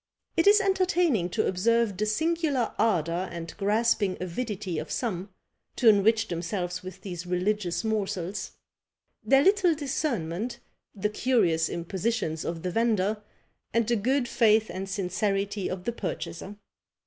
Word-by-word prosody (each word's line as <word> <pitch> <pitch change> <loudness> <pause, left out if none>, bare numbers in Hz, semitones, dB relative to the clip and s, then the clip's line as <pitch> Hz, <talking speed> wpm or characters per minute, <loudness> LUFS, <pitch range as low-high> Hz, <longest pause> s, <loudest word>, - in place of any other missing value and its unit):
It 330 - +3
is 415 +1 +8
entertaining 360 - +2
to - - 0
observe 225 +3 +2
the 215 +3 -1
singular 310 +1 0
ardour 175 -3 +1
and 170 -1 -7
grasping 205 -1 +1
avidity 185 -2 -3
of 155 - -6
some, 200 -5 -2 0.5
to 245 - +2
enrich 220 +2 +4
themselves 175 +1 -3
with 185 0 -9
these 180 -2 -6
religious 180 -1 0
morsels; 205 -4 -2 0.7
their 270 0 +5
little 380 -3 +4
discernment, 240 - -2 0.4
the 210 +1 -1
curious 205 -9 +2
impositions 170 -2 -2
of 165 -1 -4
the 180 - -2
vendor, 215 -1 +1 0.5
and 230 -1 +3
the 235 - +2
good 250 +4 +1
faith 220 -2 +3
and 190 +1 -5
sincerity 195 +1 -1
of 185 -1 -5
the 235 - -1
purchaser. 195 -1 -5
210 Hz, 135 wpm, -27 LUFS, 180-235 Hz, 0.7 s, is